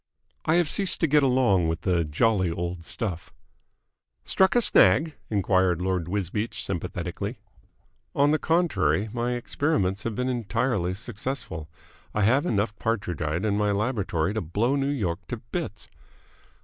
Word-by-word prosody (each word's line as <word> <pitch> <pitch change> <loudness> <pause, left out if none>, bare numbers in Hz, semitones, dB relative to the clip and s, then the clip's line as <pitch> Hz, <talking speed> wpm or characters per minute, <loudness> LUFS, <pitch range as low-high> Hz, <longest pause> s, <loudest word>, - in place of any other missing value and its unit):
"I 160 - +3
have 175 -2 +3
ceased 195 +4 +1
to - - +5
get 150 +1 +4
along 125 -10 +3
with 80 +1 -2
the 90 -2 +1
jolly 95 +5 +1
old 85 +1 -4
stuff." 90 -2 -5 0.9
"Struck 190 +3 +3
a 240 - +5
snag?" 150 - +5 0.2
enquired 95 -4 +2
Lord 90 -2 -1
Wisbeach 105 +3 -2
sympathetically. 90 -4 -4 0.8
"On 145 +1 +4
the 155 - +2
contrary, 110 - +1
my 120 0 -1
experiments 115 -6 0
have 115 -2 -3
been 125 +2 -1
entirely 115 -5 -1
successful. 105 - -5 0.5
I 105 - +2
have 130 - +3
enough 105 - 0
Partridgite 90 -6 -1
in 105 -2 +1
my 105 -1 +2
laboratory 100 -5 0
to 110 - -1
blow 105 - 0
New 135 -1 0
York 100 -12 -1
to 120 - -4
bits!" 115 - -6
105 Hz, 145 wpm, -26 LUFS, 90-130 Hz, 0.9 s, to